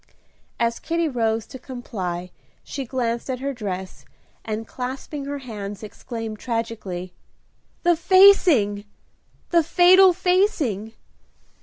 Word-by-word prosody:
As 235 0 0
Kitty 335 0 -1
rose 225 -5 0
to 260 - -10
comply 190 -9 -5 0.3
she 275 -2 -5
glanced 235 -1 -2
at 255 - -1
her 275 +1 -3
dress, 190 -5 -6 0.4
and, 220 0 -4
clasping 265 +3 -5
her 285 +1 -4
hands, 210 -6 -7
exclaimed, 220 0 -7
tragically, 220 -7 -4 0.7
"The 345 -1 +4
facing, 325 - +5 0.7
the 340 -1 +5
fatal 360 +3 +6
facing! 350 - 0
240 Hz, 110 wpm, -23 LUFS, 215-310 Hz, 0.7 s, fatal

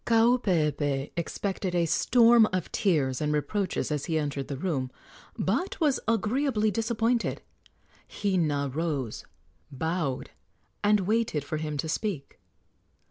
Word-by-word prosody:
Kaupeepee 165 - +2
expected 185 +2 -3
a 170 -1 +3
storm 230 +6 +5
of 185 -2 -2
tears 145 -10 +1
and 150 0 0
reproaches 185 +5 -1
as 150 -2 -1
he 160 - 0
entered 145 -3 -2
the 140 - -4
room, 140 -6 -2 0.5
but 375 - -1
was 295 -5 +2
agreeably 225 0 +1
disappointed. 230 +2 0 0.7
Hina 155 -8 0
rose, 145 -7 -2 0.5
bowed, 155 -1 -2 0.5
and 205 0 +4
waited 210 -6 0
for 155 +2 -3
him 150 -1 -3
to 150 - -2
speak. 170 -3 -3
170 Hz, 120 wpm, -28 LUFS, 150-215 Hz, 0.7 s, storm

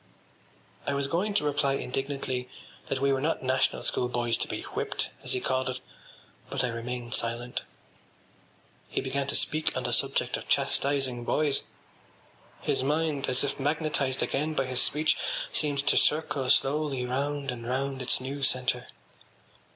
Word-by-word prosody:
I 140 - +1
was 140 0 0
going 185 +8 0
to 205 - +3
reply 145 -1 +1
indignantly 135 -1 -3 0.4
that 135 - -1
we 140 0 +3
were 135 - 0
not 155 -2 0
National 130 0 +1
School 125 - +1
boys 120 -1 +1
to - - -2
be - - -4
whipped, - - -3
as - - -1
he 125 - +1
called 130 +1 0
it; 130 0 -3 0.7
but 135 -1 0
I 125 - +1
remained 120 +1 -4
silent. 120 +1 -1 1.3
He - - -1
began 135 +1 -1
to - - 0
speak 155 0 +1
on - - -2
the - - 0
subject - - +2
of - - -9
chastising 135 -3 +1
boys. 145 +2 +2 1.0
His - - +1
mind, 150 0 0
as 130 +2 +3
if 140 - -2
magnetised 145 -2 0
again 155 +3 -1
by 135 - +1
his 130 0 +1
speech, 155 +1 +2 0.3
seemed 145 -2 +2
to 150 - +4
circle 150 -4 +2
slowly 140 -2 +2
round 140 +2 -1
and 120 -1 -7
round 135 +1 -1
its 125 - +3
new 135 +2 -5
centre. 130 -1 +1
135 Hz, 160 wpm, -28 LUFS, 125-145 Hz, 1.3 s, to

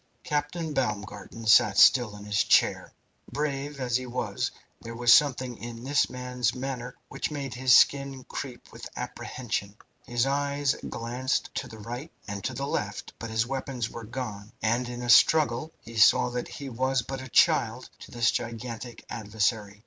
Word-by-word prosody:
Captain 150 +2 -2
Baumgarten 115 -2 -3
sat 105 -1 +6
still 120 -5 +6
in 105 0 -10
his 105 -1 +2
chair. - - +3 0.4
Brave 145 -1 -3
as 125 -2 +1
he 130 0 -6
was, 125 +1 -2 0.3
there 115 0 -8
was 120 0 +6
something 130 -4 +3
in 115 0 -8
this 145 +2 +2
man's 125 -1 -2
manner 125 -1 -5
which - - -3
made 140 -4 -5
his 125 +1 +6
skin 140 -2 +2
creep 125 -2 -7
with - - -9
apprehension. 105 -5 -4 0.3
His 120 +1 +1
eyes 140 0 0
glanced 125 +3 -2
to - - -3
right 120 +8 -7 0.2
and 100 -1 -5
to 140 - -2
left, 105 -7 -3
but 115 - -5
his 110 0 +1
weapons 130 -2 -3
were 115 - -7
gone, 110 -3 -6
and 120 +3 +1
in 120 0 -6
a - - -4
struggle 150 +3 +5
he 115 0 -10
saw 110 +2 +5
that 125 0 -3
he 140 - -8
was 130 0 0
but 135 -1 -5
a 130 - -9
child - - +3
to - - -11
this 120 -1 +2
gigantic 115 0 -5
adversary. 105 -1 -2
125 Hz, 165 wpm, -27 LUFS, 115-135 Hz, 0.4 s, sat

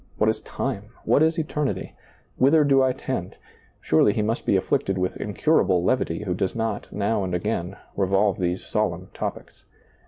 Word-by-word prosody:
What - - +3
is - - -6
time? 100 +1 -4 0.2
What - - +4
is 160 +1 +3
eternity? 150 -3 -2 0.4
Whither 150 +4 +5
do 135 -2 +4
I 130 0 +3
tend? 125 -8 -4 0.5
Surely 80 +6 +3
he 105 - 0
must 115 +3 -2
be - - +4
afflicted 95 0 0
with 90 0 -1
incurable 100 - +2
levity 95 -5 0
who 95 -4 -1
does 95 +1 -2
not, 110 -2 -3
now 105 0 0
and 90 -1 -2
again, 90 0 -2 0.2
revolve 100 +1 +2
these 90 0 -1
solemn 95 -4 -1
topics. - - -6
105 Hz, 165 wpm, -24 LUFS, 95-130 Hz, 0.5 s, Whither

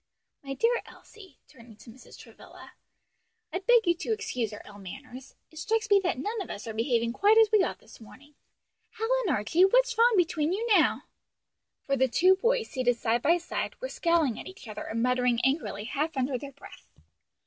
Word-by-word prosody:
My 275 -1 -6
dear 470 - +1
Elsie," 380 -10 -16
turning 230 -3 -16
to 225 +2 -14
Mrs. 255 +3 -16
Travilla, - - -15 0.8
"I 360 - -1
beg 470 +3 +3
you 345 - +3
to 375 - -4
excuse 425 - -2
our 210 - -10
ill 205 -1 -13
manners. 255 +6 -11 0.2
It 315 - -11
strikes 445 +2 -1
me 400 - +7
that 365 -7 -2
none 425 - -3
of - - -7
us 200 - -7
are 225 - -6
behaving 230 0 0
quite 415 - +4
as 445 -1 +5
we 430 -2 +5
ought - - -2
this - - -18
morning. 275 +7 -16 0.6
Hal 450 - -2 0.2
and 300 - +2
Archie, 225 - +2
what's - - +3
wrong 475 +1 +5
between 325 -2 +1
you 435 +4 -2
now?" - - +2 0.8
For 275 - 0
the 260 0 +2
two 365 +9 +4
boys, 470 +2 0
seated 250 -3 0
side 235 +1 0
by 335 +6 +3
side, 345 - -5
were - - -5
scowling 335 - 0
at - - -9
each 375 -9 -12
other, 215 -1 -7
and 230 +1 -2
muttering 250 -1 +1
angrily 265 -7 -1
half 300 +5 -3
under 260 +1 -1
their 275 +3 -6
breath. 285 - -16
295 Hz, 200 wpm, -27 LUFS, 245-405 Hz, 0.8 s, me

